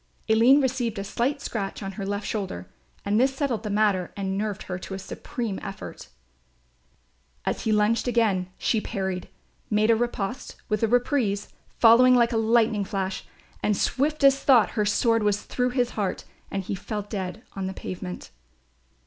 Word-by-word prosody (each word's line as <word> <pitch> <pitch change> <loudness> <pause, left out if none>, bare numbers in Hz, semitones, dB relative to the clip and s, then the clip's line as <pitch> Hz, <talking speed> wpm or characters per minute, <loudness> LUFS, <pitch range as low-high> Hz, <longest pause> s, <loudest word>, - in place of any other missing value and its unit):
Aline 235 +6 +6
received 245 -4 -1
a 200 - -3
slight 250 +8 -1
scratch 200 -4 -4
on 195 - -4
her 195 0 -5
left 205 +1 -2
shoulder 190 - -4 0.4
and 205 +2 +2
this 265 +2 +2
settled 270 -5 -1
the 215 - -5
matter 200 -3 +1
and 190 -1 -2
nerved 210 0 -2
her 180 -1 -5
to 190 - -6
a - - -4
supreme 210 +1 -5
effort. 195 -1 -8 1.4
As - - -2
he 220 - +2
lunged 215 +3 +2
again 215 -6 +1
she 220 - +1
parried, 190 -3 -3 0.4
made 215 +1 +3
a - - +5
riposte 240 -1 -3
with 215 -1 0
a 225 - +3
reprise 240 -4 +1 0.3
following 245 +2 +7
like 235 -1 +4
a - - +1
lightning 225 -2 +3
flash 195 -1 -3 0.4
and 210 -2 +1
swift 300 +2 0
as 275 0 +6
thought 245 -6 +5
her 210 -2 0
sword 230 +2 +2
was 210 -1 +1
through 250 0 -1
his 245 -1 0
heart 200 -4 -2 0.3
and 195 -1 -3
he 190 - -4
fell 205 +2 -4
dead 200 +1 -5
on 195 -1 -3
the - - -3
pavement. 180 0 -7
215 Hz, 175 wpm, -25 LUFS, 195-240 Hz, 1.4 s, following